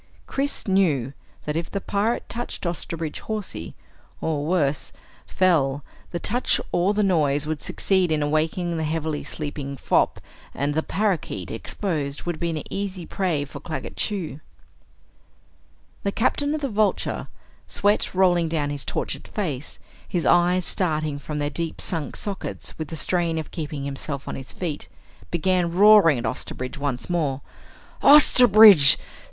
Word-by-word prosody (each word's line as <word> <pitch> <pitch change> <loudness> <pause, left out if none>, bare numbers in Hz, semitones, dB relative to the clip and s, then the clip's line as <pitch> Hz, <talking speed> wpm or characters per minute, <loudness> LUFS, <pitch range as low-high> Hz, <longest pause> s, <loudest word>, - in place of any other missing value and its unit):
Chris 280 -3 -2
knew 155 -10 +2 0.3
that 150 - -2
if 165 +1 -2
the 200 - -3
pirate 205 +4 -1
touched 240 -4 -5
Osterbridge 165 -2 -4
Hawsey, 210 - -5 0.4
or 155 -3 -1
worse, 150 -5 0 0.4
fell, 145 -7 +2 0.3
the 175 - -4
touch 240 +8 +1
or 185 +4 +2
the 210 - +2
noise 150 -6 +2
would 155 -1 -3
succeed 190 -4 +1
in 150 -1 +1
awakening 160 +3 0
the 160 - -1
heavily 155 -1 -2
sleeping 145 -2 -5
fop - - +1 0.4
and 145 +2 -1
the 160 - +1
parakeet, 180 - -2
exposed, 145 - -3
would 175 -2 -3
be 170 - -1
an 160 -2 -3
easy 195 -3 -4
prey 170 -8 -1
for 140 0 -9
Claggett 155 +2 -6
Chew. 180 -8 -2 1.6
The 200 - -1
Captain 285 +7 0
of 310 - -4
the 280 - 0
Vulture, 215 -2 0 0.4
sweat 205 -1 +1
rolling 175 -3 +3
down 150 -3 -1
his 145 -1 -3
tortured - - -3
face, 150 -9 -4 0.3
his 175 -3 -1
eyes 175 +1 +3
starting 155 -5 -1
from 150 +2 -5
their 145 0 -1
deep 165 -1 -4
sunk 160 -6 -2
sockets 95 - -5
with 155 - -3
the 165 - -7
strain 170 +1 0
of 160 - -5
keeping 150 -4 -5
himself 140 0 -5
on - - -4
his 130 - -7
feet, 165 -5 -5 0.4
began 175 0 +1
roaring 195 -5 +6
at 120 - -4
Osterbridge 130 +4 -4
once 140 -3 -3
more. 150 -6 -1 0.6
"Osterbridge! 220 - +8
165 Hz, 145 wpm, -24 LUFS, 145-190 Hz, 1.6 s, Osterbridge